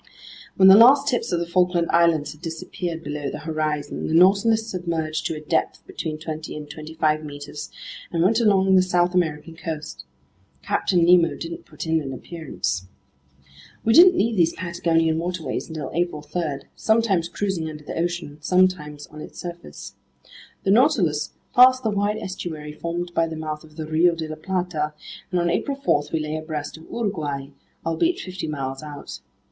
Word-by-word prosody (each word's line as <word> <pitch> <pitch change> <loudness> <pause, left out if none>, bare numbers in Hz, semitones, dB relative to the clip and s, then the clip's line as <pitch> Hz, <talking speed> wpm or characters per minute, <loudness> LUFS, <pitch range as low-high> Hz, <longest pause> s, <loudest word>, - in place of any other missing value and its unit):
When 190 - +6
the 190 - +10
last 265 +6 +7
tips 245 -2 0
of 175 - +1
the 170 - -1
Falkland 180 0 +2
Islands 165 -4 +3
had 150 - -14
disappeared 165 0 -5
below 145 -2 -4
the - - -5
horizon, 155 -2 -2
the 160 - 0
Nautilus 200 +5 +5
submerged 165 -6 -2
to - - -3
a 155 - -7
depth - - 0
between 155 -2 -5
twenty 155 0 -6
and 150 -1 -7
twenty 155 +1 -9
five 155 -1 +1
meters 145 0 -7 0.4
and 165 -1 +1
went 220 +5 +3
along 195 -4 +4
the 185 - +7
South 180 -1 +1
American 165 -2 -1
coast. 155 - -6 0.6
Captain 175 -3 +2
Nemo 175 -1 +5
didn't 165 0 -7
put 150 0 -7
in 160 0 +1
an 135 -2 -5
appearance. 125 - -4 1.0
We 225 - +4
didn't 360 +5 +8
leave 230 +1 +2
these 170 -3 +3
Patagonian 165 -2 +1
waterways 175 -1 -3
until 155 -4 -5
April 170 -3 -1
3, 150 -3 -3
sometimes 215 -7 +2
cruising 180 -4 -2
under 150 -1 -9
the - - -6
ocean, 170 -3 -3
sometimes 165 -5 +1
on 155 0 -11
its - - -10
surface. 175 -1 -8 0.7
The 195 - +2
Nautilus 190 - +3 0.2
passed 255 +1 +7
the 220 - +1
wide 205 +1 0
estuary 160 -6 -6
formed 170 +2 -4
by 165 -1 +2
the 160 - -6
mouth 155 -1 -5
of 155 -1 -17
the 155 -1 -5
Rio 165 +3 +3
de 160 -1 -4
la 155 - -5
Plata, 165 -3 -2 0.4
and 180 - +1
on 170 0 +1
April 275 - -1
4 145 - +1
we 160 - 0
lay 155 0 -3
abreast 155 -2 -5
of 160 0 -13
Uruguay, 150 -11 -3 0.4
albeit 250 - +1
fifty 185 -1 -5
miles 135 -3 -4
out. 150 -2 -8
165 Hz, 175 wpm, -23 LUFS, 155-185 Hz, 1.0 s, the